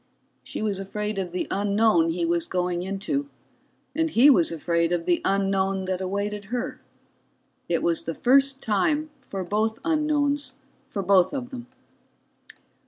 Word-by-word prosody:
She - - -5
was 205 -3 -1
afraid 210 +1 -3
of 180 -2 -3
the 180 - -2
unknown 200 -3 +3
he 170 +1 -1
was 170 0 0
going 180 -1 -1
into, 200 +10 -3 0.7
and 325 0 +1
he 280 +1 +6
was 175 -11 +3
afraid 170 +1 0
of 170 -1 -1
the 175 -1 +2
unknown 195 -1 +1
that 185 0 -2
awaited 200 +2 -3
her 240 +4 -4 0.9
it 170 - 0
was 170 -1 +1
the 165 - -3
first 270 +1 +3
time 295 +9 +1
for 195 -7 -5
both 215 +4 0
unknowns 300 -3 +1 0.3
for 200 - -3
both 185 +3 +4
of 255 -2 -5
them. 245 -2 -8
200 Hz, 150 wpm, -25 LUFS, 180-250 Hz, 0.9 s, he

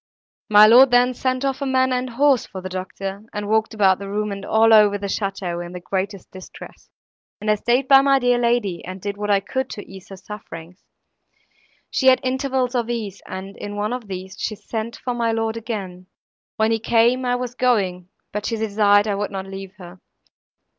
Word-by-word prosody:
My 210 0 +8
lord 250 +5 +7
then 245 +1 +4
sent 255 +2 -2
off 270 0 -2
a - - -1
man 260 0 +2
and 255 0 -2
horse 265 0 +2
for 190 - -8
the 185 0 -7
doctor, 190 +2 -6
and 205 0 -4
walked 220 +1 0
about 190 -3 +3
the 200 0 -7
room 210 +1 -2
and 200 0 -6
all 225 +2 +4
over 210 -2 +6
the 200 - -6
château 195 -3 -3
in 175 +1 -9
the 180 - -6
greatest 190 +1 -4
distress; 185 0 -12 0.5
and 215 0 0
I - - +5
staid 245 +5 0
by 270 0 +7
my 275 0 +4
dear 245 -2 +2
lady, 235 -7 0
and 185 +2 -7
did 200 +1 -4
what 205 0 -4
I 200 -1 +4
could 260 +6 -3
to 205 - -8
ease 190 -1 -13
her 195 - -9
sufferings. 180 -3 -10 1.1
She 265 - +1
had 260 0 +6
intervals 260 -1 -1
of 240 -2 -1
ease, 215 -5 -4
and 190 +1 -7
in 205 0 -7
one 210 +3 -2
of 250 -4 -6
these 190 0 -7
she 215 - -3
sent 220 +2 -5
for 250 - -4
my 235 -1 0
lord 225 0 -1
again; 195 -6 -6 0.5
when 220 +1 +1
he 225 - +1
came, 235 +3 +2
I 245 0 +1
was 245 -1 -4
going, 195 -8 0 0.2
but 210 0 -3
she 230 - -1
desired 205 -1 +3
I 205 - 0
would 200 +1 -2
not 190 -1 -5
leave 195 0 -9
her. 180 -1 -12
210 Hz, 210 wpm, -21 LUFS, 195-245 Hz, 1.1 s, My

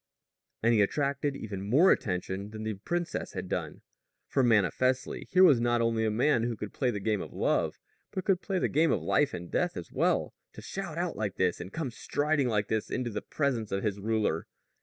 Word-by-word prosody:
And 115 +1 +4
he 110 - +4
attracted 140 +5 0
even 100 -7 -5
more 155 - +6
attention 95 +1 -1
than 110 0 -7
the 110 0 -2
princess 170 - -3
had - - -4
done; - - -4 0.5
for, 135 - +1
manifestly, 125 +3 +1
here 185 0 +5
was 140 -10 +6
not 120 0 +2
only 115 -1 +1
a - - +2
man 120 +3 +2
who 115 -1 -2
could 105 - -6
play 130 - 0
the 105 -4 -2
game 105 0 0
of - - -7
love, - - 0 0.3
but 190 - -4
could 190 -2 +2
play 195 -2 -2
the - - +1
game 160 +2 +3
of - - 0
life 145 -1 +2
and 85 0 -7
death - - 0
as - - -7
well - - +1 0.2
to - - -10
shout 180 -5 -5
out 175 -1 -1
like 105 -3 -3
this, 90 -2 +1
and 95 - -8
come 155 -6 -3
striding 145 +3 0
like 105 -3 0
this 110 -1 -1
into 125 -2 -2
the 105 - -3
presence 125 -8 -1
of 100 0 -1
his 100 -2 -1
ruler. 105 -6 0
115 Hz, 215 wpm, -29 LUFS, 105-145 Hz, 0.5 s, more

